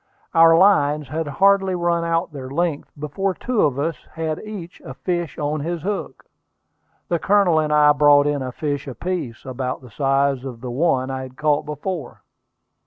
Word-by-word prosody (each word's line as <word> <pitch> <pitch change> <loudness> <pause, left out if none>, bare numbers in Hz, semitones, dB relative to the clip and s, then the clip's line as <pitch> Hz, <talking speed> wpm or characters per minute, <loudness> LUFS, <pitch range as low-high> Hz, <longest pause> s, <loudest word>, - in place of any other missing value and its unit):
Our 165 0 +7
lines 150 -7 +3
had 160 +2 -3
hardly 195 +5 +3
run 170 -1 0
out 165 0 -1
their 130 -2 -7
length 160 +1 -2
before 180 +6 -2
two 245 -3 -1
of 140 -3 +2
us 160 +3 -1 0.2
had 160 -1 -3
each 200 -5 -9
a - - -8
fish 175 -3 -3
on 150 +1 -1
his 165 +2 -4
hook. 205 +1 -4 0.8
The 170 - 0
Colonel 195 -5 +3
and 155 -1 0
I 150 0 +6
brought 145 -1 +5
in 145 -1 0
a 130 -1 -4
fish 145 +1 -3
apiece, 140 -3 -4
about 130 0 -4
the 125 -3 -14
size 135 +1 +1
of 130 -4 -7
the 125 -1 -5
one 130 -2 +1
I 130 0 -4
had 130 0 -10
caught 150 -1 +1
before. 150 -1 -5
150 Hz, 175 wpm, -21 LUFS, 140-175 Hz, 0.8 s, Our